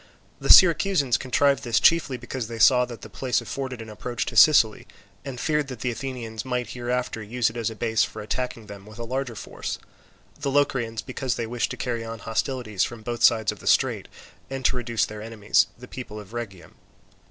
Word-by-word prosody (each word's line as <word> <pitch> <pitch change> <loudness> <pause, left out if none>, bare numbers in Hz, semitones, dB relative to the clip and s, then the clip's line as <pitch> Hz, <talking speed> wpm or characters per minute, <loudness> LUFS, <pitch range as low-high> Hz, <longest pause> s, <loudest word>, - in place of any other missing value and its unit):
The - - -4
Syracusans 175 -7 +6
contrived 140 +1 +2
this 120 -2 +2
chiefly 160 -6 +3
because 125 -1 -5
they 115 0 -6
saw 125 +2 +6
that 120 -2 -10
the - - -9
place 125 -3 -1
afforded 130 -4 -5
an 110 - -11
approach 120 +2 -4
to 115 - -6
Sicily, 115 -4 +6 0.4
and 135 -3 -6
feared 150 -1 0
that 130 -4 -8
the 125 - 0
Athenians 115 -3 -5
might 125 -1 -3
hereafter 125 -1 -2
use 115 +2 0
it - - -17
as 115 -2 -1
a 110 - -8
base 110 0 +1
for - - -5
attacking 120 0 -3
them 100 -1 -11
with 105 +1 -12
a 120 - -5
larger 130 0 -3
force; - - -5 0.6
the 140 - -2
Locrians 125 -5 0
because 130 -1 -3
they 115 - -3
wished 120 +1 -2
to 125 - -6
carry 120 -1 -2
on 115 0 -6
hostilities 115 -2 -2
from 115 -2 -5
both 120 +1 -4
sides 110 -2 +4
of - - -11
the - - -10
strait - - +2 0.4
and 135 -1 -5
to - - +3
reduce 120 -3 0
their 105 0 -8
enemies, 105 -4 +1
the 125 +1 -12
people 120 -5 -8
of 105 +1 -12
Rhegium. 100 -7 -7
120 Hz, 205 wpm, -25 LUFS, 110-130 Hz, 0.6 s, Syracusans